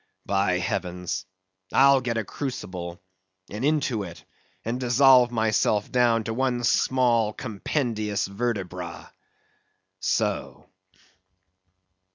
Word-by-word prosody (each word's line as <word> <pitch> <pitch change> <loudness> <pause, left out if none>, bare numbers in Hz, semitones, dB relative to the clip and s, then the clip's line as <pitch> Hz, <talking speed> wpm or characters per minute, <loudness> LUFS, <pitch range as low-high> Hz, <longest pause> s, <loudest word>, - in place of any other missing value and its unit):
By 95 -2 +1
heavens! 90 0 -3 0.4
I'll 135 0 +5
get 120 -2 -2
a 115 - 0
crucible, 90 -10 -6 0.5
and 105 +4 -5
into 140 -6 +1
it, 90 -4 -9 0.4
and 120 +3 -2
dissolve 125 0 +5
myself 110 -2 +1
down 120 -2 +3
to 110 - -3
one 125 0 0
small, 120 -3 +2
compendious 110 -2 -2
vertebra. 95 -5 -4 0.9
So. - - -1
115 Hz, 95 wpm, -25 LUFS, 100-125 Hz, 0.9 s, I'll